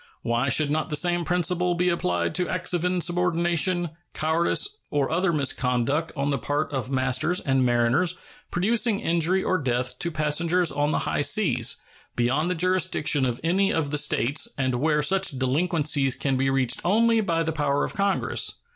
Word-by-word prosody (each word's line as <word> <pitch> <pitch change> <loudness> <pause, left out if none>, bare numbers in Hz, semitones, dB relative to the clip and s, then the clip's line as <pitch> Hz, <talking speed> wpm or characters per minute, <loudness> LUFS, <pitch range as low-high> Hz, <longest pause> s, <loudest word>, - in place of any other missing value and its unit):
Why 120 +3 0
should 145 +2 +2
not 155 +3 -1
the 150 - -1
same 175 +2 +1
principle 180 +1 0
be 180 +1 +1
applied 90 - -1
to 180 -1 -1
acts 185 0 -1
of 175 -1 0
insubordination, 175 -1 +1 0.2
cowardice, 170 - 0
or 145 -1 -1
other 175 +2 +1
misconduct 140 +1 0
on 140 +1 -1
the 140 - -1
part 145 +1 -2
of 130 -2 -3
masters 130 +6 0
and 135 -2 +1
mariners 120 +9 +2 0.3
producing 220 +3 +1
injury 170 +3 +1
or 185 0 0
death 125 -2 -2
to 170 - 0
passengers 165 +3 +1
on 145 0 0
the - - -1
high - - -1
seas, 145 - 0 0.3
beyond 130 +8 0
the 180 - -1
jurisdiction 180 -6 +1
of 120 -1 -3
any 190 +4 +2
of 155 -3 -1
the 150 - -1
States, 145 -1 +1
and 130 -2 -1
where 150 -1 +1
such 190 -3 +1
delinquencies 145 0 +1
can 135 -2 -1
be 135 +1 +1
reached 130 -2 0
only 225 +5 +3
by 165 -5 0
the 160 - -1
power 145 -2 0
of - - -3
Congress? 200 -1 0
155 Hz, 175 wpm, -24 LUFS, 135-180 Hz, 0.3 s, only